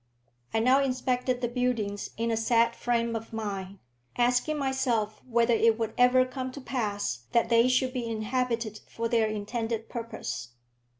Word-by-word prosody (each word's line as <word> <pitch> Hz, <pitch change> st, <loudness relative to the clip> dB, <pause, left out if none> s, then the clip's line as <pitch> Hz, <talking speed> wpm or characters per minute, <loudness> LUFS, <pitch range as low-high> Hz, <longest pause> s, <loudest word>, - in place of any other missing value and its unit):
I -, -, 0 dB
now 255 Hz, +4 st, +4 dB
inspected 255 Hz, -1 st, 0 dB
the 240 Hz, -, +1 dB
buildings 235 Hz, -5 st, -1 dB
in 230 Hz, +1 st, 0 dB
a -, -, +2 dB
sad 230 Hz, +1 st, +2 dB
frame 235 Hz, -1 st, 0 dB
of 225 Hz, 0 st, -5 dB
mind, 200 Hz, -3 st, -4 dB, 0.4 s
asking 245 Hz, +5 st, +2 dB
myself 245 Hz, -6 st, 0 dB
whether 235 Hz, -1 st, +2 dB
it 225 Hz, 0 st, +4 dB
would 225 Hz, -1 st, -2 dB
ever 250 Hz, +1 st, +5 dB
come 255 Hz, 0 st, -5 dB
to 280 Hz, -, -7 dB
pass 205 Hz, -, -2 dB
that 235 Hz, -, +3 dB
they 230 Hz, +1 st, +5 dB
should 255 Hz, 0 st, +2 dB
be 245 Hz, -3 st, -3 dB
inhabited 230 Hz, -1 st, -1 dB
for 230 Hz, 0 st, -3 dB
their 230 Hz, -1 st, +2 dB
intended 225 Hz, +1 st, -3 dB
purpose. 220 Hz, -, -5 dB
230 Hz, 160 wpm, -28 LUFS, 220-250 Hz, 0.4 s, ever